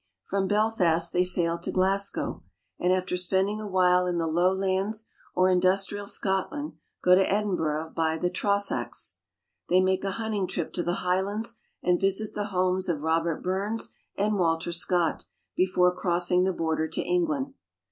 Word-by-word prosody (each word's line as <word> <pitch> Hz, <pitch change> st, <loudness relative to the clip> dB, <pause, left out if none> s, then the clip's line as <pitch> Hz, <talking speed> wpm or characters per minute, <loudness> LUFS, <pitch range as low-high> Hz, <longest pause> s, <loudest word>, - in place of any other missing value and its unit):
From 195 Hz, 0 st, -1 dB
Belfast, 190 Hz, -6 st, +2 dB
they 180 Hz, -, +3 dB
sail 170 Hz, -2 st, +1 dB
to 170 Hz, -, -4 dB
Glasgow, 195 Hz, +2 st, 0 dB, 0.4 s
and 180 Hz, -, +2 dB
after 185 Hz, 0 st, 0 dB
spending 190 Hz, +4 st, +1 dB
a 215 Hz, -, -5 dB
while 180 Hz, -1 st, +3 dB
in 175 Hz, -1 st, -1 dB
the 165 Hz, -, 0 dB
Lowlands 190 Hz, +5 st, +1 dB, 0.3 s
or 185 Hz, 0 st, +4 dB
Industrial 190 Hz, +2 st, +1 dB
Scotland 205 Hz, +12 st, -2 dB, 0.3 s
go 180 Hz, -, +6 dB
to 190 Hz, +1 st, +4 dB
Edinburgh 160 Hz, -7 st, -1 dB
by 160 Hz, -1 st, +1 dB
the 175 Hz, +2 st, -1 dB
Trossachs. 200 Hz, +2 st, -1 dB, 0.5 s
They 180 Hz, -, +5 dB
make 185 Hz, 0 st, +1 dB
a 195 Hz, -, 0 dB
hunting 215 Hz, -4 st, -1 dB
trip 170 Hz, -2 st, -4 dB
to 175 Hz, -, -1 dB
the 175 Hz, +1 st, -2 dB
Highlands, 200 Hz, +5 st, 0 dB, 0.3 s
and 180 Hz, 0 st, +2 dB
visit 195 Hz, +2 st, 0 dB
the 205 Hz, -, -2 dB
homes 185 Hz, -1 st, 0 dB
of 155 Hz, -4 st, -1 dB
Robert 165 Hz, +1 st, 0 dB
Burns 200 Hz, +5 st, -2 dB, 0.2 s
and 205 Hz, 0 st, +1 dB
Walter 165 Hz, -1 st, +1 dB
Scott 170 Hz, 0 st, +1 dB, 0.3 s
before 180 Hz, -1 st, +3 dB
crossing 180 Hz, 0 st, +2 dB
the 190 Hz, -, +2 dB
border 160 Hz, -1 st, -1 dB
to 160 Hz, -, -2 dB
England. 305 Hz, -6 st, 0 dB
185 Hz, 155 wpm, -27 LUFS, 175-200 Hz, 0.5 s, go